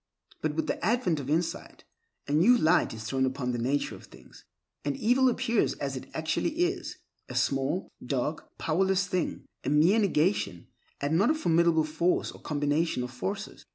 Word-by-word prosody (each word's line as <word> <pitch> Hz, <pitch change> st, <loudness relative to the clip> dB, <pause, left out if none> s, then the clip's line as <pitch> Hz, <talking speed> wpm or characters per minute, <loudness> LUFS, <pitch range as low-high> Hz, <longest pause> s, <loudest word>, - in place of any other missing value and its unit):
But 155 Hz, -1 st, -1 dB
with 160 Hz, -, 0 dB
the -, -, -3 dB
advent 190 Hz, -6 st, +1 dB
of 140 Hz, -1 st, -6 dB
insight, 165 Hz, +3 st, -2 dB, 0.4 s
a -, -, -4 dB
new 185 Hz, +12 st, +5 dB
light 160 Hz, -6 st, +3 dB
is 110 Hz, -1 st, -7 dB
thrown 130 Hz, +4 st, -1 dB
upon 130 Hz, -1 st, -1 dB
the 120 Hz, -, -2 dB
nature 135 Hz, +5 st, 0 dB
of -, -, -11 dB
things, -, -, -17 dB, 0.4 s
and 145 Hz, -1 st, -2 dB
evil 255 Hz, +4 st, +4 dB
appears 235 Hz, -2 st, +1 dB
as 140 Hz, -1 st, -4 dB
it 130 Hz, -, -7 dB
actually 160 Hz, -, -1 dB
is—a 355 Hz, +1 st, -4 dB
small, 135 Hz, +6 st, 0 dB, 0.2 s
dark, 135 Hz, +4 st, -3 dB
powerless 190 Hz, +4 st, +1 dB
thing, 185 Hz, -2 st, -2 dB, 0.2 s
a -, -, -1 dB
mere 160 Hz, +9 st, +4 dB
negation, 160 Hz, -, +1 dB, 0.3 s
and 150 Hz, +4 st, +1 dB
not 205 Hz, -, +4 dB
a 315 Hz, -, +3 dB
formidable 170 Hz, -, +3 dB
force 160 Hz, +4 st, 0 dB
or -, -, -14 dB
combination 145 Hz, -1 st, 0 dB
of 125 Hz, -, -6 dB
forces. 195 Hz, -, -5 dB
160 Hz, 170 wpm, -28 LUFS, 140-190 Hz, 0.4 s, new